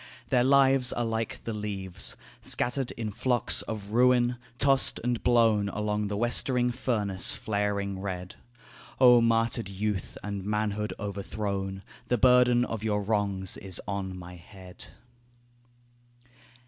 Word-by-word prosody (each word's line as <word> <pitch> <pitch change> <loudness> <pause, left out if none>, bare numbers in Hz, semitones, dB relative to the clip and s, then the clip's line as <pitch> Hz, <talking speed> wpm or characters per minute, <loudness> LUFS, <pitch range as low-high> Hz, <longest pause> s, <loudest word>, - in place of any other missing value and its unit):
Their 125 -2 +3
lives 135 -1 +4
are 120 - -1
like 115 0 -3
the 115 - -4
leaves 100 -4 -2 0.2
Scattered 125 +1 -2
in 110 -2 -5
flocks 120 +2 +2
of 105 -2 -7
ruin, 125 +1 +3 0.2
tossed 135 0 +3
and 120 -1 -1
blown 115 -4 +3
Along 105 0 -2
the 100 0 -3
westering 120 +2 +1
furnace 105 -6 0
flaring 100 -2 -2
red. 90 -2 -5 0.7
O 125 -2 +7
martyred 115 -2 +1
youth 100 -1 -3
and 100 -1 -5
manhood 105 0 -2
overthrown, 100 -1 -4 0.2
The 125 - +1
burden 125 0 +4
of 115 -3 -5
your 105 -2 0
wrongs 100 -3 -1
is 95 -3 0
on 95 -2 -4
my 90 0 -10
head. 90 0 -13
105 Hz, 125 wpm, -27 LUFS, 100-120 Hz, 0.7 s, O